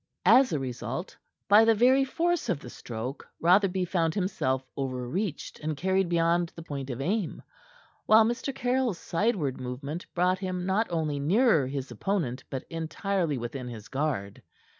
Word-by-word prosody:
As 260 0 +6
a 155 - +1
result, 130 - -5 0.3
by 210 +2 +7
the 225 0 +5
very 255 +5 +5
force 335 0 0
of 175 -7 0
the 125 - -10
stroke, 120 +4 -6
Rotherby 185 +1 +3
found 165 -3 0
himself 135 -9 -1
over 130 -3 -3
reached 180 - -3
and 155 -1 -3
carried 190 +2 +1
beyond 170 0 +2
his 165 - -9
point 140 -3 -5
of 125 -1 -4
aim; 190 +4 -2 0.6
while 220 0 +7
Mr. 240 +4 -1
Caryll's 250 -5 0
sideward 170 - -1
movement 140 +7 -5
brought 180 +1 +2
him 185 -2 -3
not 195 +4 +1
only 155 -4 -1
nearer 165 - +3
his 135 -1 -4
opponent, 130 - -2
but 130 - -5
entirely 165 0 -1
within 125 +2 -5
his 110 -4 -9
guard. 135 -9 -2
170 Hz, 160 wpm, -28 LUFS, 135-200 Hz, 0.6 s, by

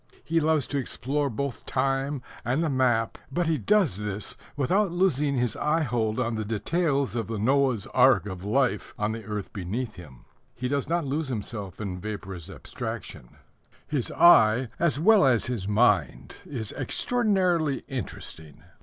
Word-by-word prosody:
He 165 0 +1
loves 155 -3 +2
to 140 - -2
explore 140 +2 -1
both 140 +2 -4
time 135 0 -1 0.2
and 130 +7 0
the 160 - 0
map, 120 -4 +1
but 175 +5 0
he 160 -3 +1
does 185 - +2
this 105 -1 -4 0.2
without 185 +8 +2
losing 150 -6 +1
his 120 -3 0
eyehold 120 -8 0
on 120 -2 0
the 110 -1 -2
details 140 - 0
of 115 - -2
the 115 -1 -3
Noah's 130 -1 +2
Ark 125 -7 +5
of 95 -3 -6
life 105 -1 0
on 105 +1 0
the 110 0 -5
earth 105 -1 -5
beneath 105 +5 -4
him. 70 -8 -13 0.3
He 125 +1 -3
does 140 +2 -1
not 170 -2 0
lose 145 +3 -2
himself 105 -5 -5
in 95 -4 -4
vaporous 95 -4 -6
abstractions; - - -7 0.6
his 140 -6 -1
eye, 120 -7 +6
as 170 -4 +2
well 210 +5 +6
as 130 -4 +3
his 115 -6 -3
mind, 105 -1 +1
is 115 -7 -5
extraordinarily 185 - 0
interesting. 80 - -6
125 Hz, 155 wpm, -26 LUFS, 105-150 Hz, 0.6 s, eye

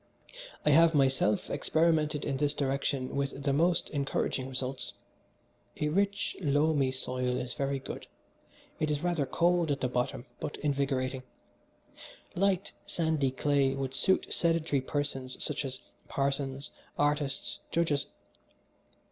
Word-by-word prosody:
I 150 - +5
have 165 +2 +6
myself 130 -7 +3
experimented 155 0 +2
in 135 - -1
this 145 +1 +1
direction 140 -1 -1
with 140 0 -2
the 140 -1 +2
most 170 +3 +3
encouraging 135 -2 -1
results. 130 0 -3 0.9
A 150 - +1
rich, 200 +5 0
loamy 145 -2 +3
soil 125 -1 -1
is 125 0 -3
very 140 -1 -1
good 135 - -7 0.7
it 155 - +1
is 150 +1 -1
rather 170 -6 +1
cold 175 +2 +2
at 140 -1 0
the 125 - +2
bottom, 125 -1 -2
but 145 - -4
invigorating. 135 -2 0 1.1
Light, 195 0 +1 0.2
sandy 160 -5 +1
clay 135 0 +2
would 135 -1 -3
suit 190 +7 +2
sedentary 165 -4 +1
persons 135 -2 -3
such 150 -1 -1
as 130 -1 -4 0.3
parsons, 140 0 -1 0.3
artists, 145 -2 0
judges. 155 -4 +1
140 Hz, 125 wpm, -30 LUFS, 135-155 Hz, 1.1 s, have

